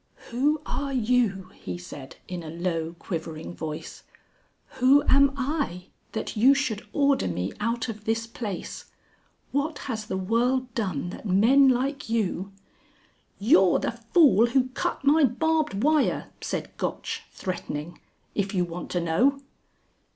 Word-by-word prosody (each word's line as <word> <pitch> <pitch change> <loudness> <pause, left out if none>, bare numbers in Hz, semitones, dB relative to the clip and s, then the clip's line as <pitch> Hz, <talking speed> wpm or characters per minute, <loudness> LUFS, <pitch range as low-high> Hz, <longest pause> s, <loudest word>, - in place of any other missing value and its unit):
"Who 290 +5 +1
are 280 -1 -3
you," 220 -6 +1
he - - -6
said, 145 -6 -10
in 180 -1 -5
a 160 - -8
low 165 0 -2
quivering 165 -2 -5
voice; 155 -2 -6 0.8
"who 270 +3 +6
am 275 +1 +5
I 265 - -2 0.2
that 220 - -4
you 255 +6 +6
should 255 -7 -2
order 280 -2 +2
me 90 +2 -2
out 230 +3 -1
of 215 -2 -7
this 225 +1 0
place? 220 -4 -6 0.7
What 290 +2 -1
has 215 -2 -4
the 190 - -2
World 245 +6 0
done 180 -7 -2
that 215 - -8
men 240 +9 +5
like 265 +1 0
you...." 200 -4 -1 0.9
"You're 195 - +5
the - - -1
fool 235 - +4
who 255 +1 +2
cut 255 - -3
my 300 +2 +5
barbed 295 -3 +1
wire," 305 0 +2
said - - -4
Gotch, - - -3
threatening, 170 -3 -5 0.3
"If 200 -1 -1
you 180 -1 +2
want 175 +1 -7
to 175 - +1
know!" 245 +13 +2
225 Hz, 140 wpm, -26 LUFS, 180-270 Hz, 0.9 s, who